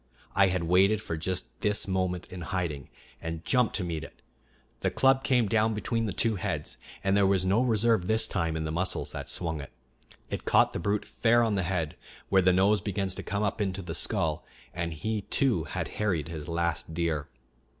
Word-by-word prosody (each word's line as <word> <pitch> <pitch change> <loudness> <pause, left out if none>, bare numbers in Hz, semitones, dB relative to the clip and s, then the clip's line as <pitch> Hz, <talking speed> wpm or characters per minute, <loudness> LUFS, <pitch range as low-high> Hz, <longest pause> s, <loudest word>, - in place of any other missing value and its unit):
I 100 -1 +5
had 90 -2 0
waited 95 +5 +4
for 85 -6 -4
just 90 +3 -2 0.2
this 105 -1 +1
moment 95 -2 -1
in 90 - -6
hiding, 85 -5 -3 0.3
and 80 0 -5
jumped 125 -3 +2
to 100 - 0
meet 80 -3 -3
it. - - -13 0.6
The - - +1
club 135 0 +3
came 125 -4 +3
down 110 0 +2
between 115 +2 -1
the - - -2
two 110 +2 0
heads; - - -3 0.3
and 95 0 +2
there 100 -1 +4
was 95 -1 +2
no 100 +5 +3
reserve 115 -5 +2
this 110 +2 +2
time 85 -4 -1
in 80 - -2
the 80 - -3
muscles 90 +3 -1
that - - -6
swung 80 -4 -2
it. 70 - -10 0.6
It - - -3
caught - - +4
the - - -2
brute 100 +4 0
fair 120 0 +3
on 110 -2 +1
the 95 - +1
head, 85 -3 -2 0.3
where 95 -1 +5
the 90 0 +5
nose 95 +2 +3
begins 95 -1 -2
to - - -5
come 100 +1 -2
up 105 +1 -1
into 95 -1 -2
the 85 -1 -5
skull, 80 -2 0 0.3
and 85 -1 -2
he 105 +7 -2
too 105 - +1
had - - -3
harried 90 -8 0
his 80 -2 -6
last 85 -1 -1
deer. 80 -4 -1
95 Hz, 205 wpm, -28 LUFS, 85-105 Hz, 0.6 s, I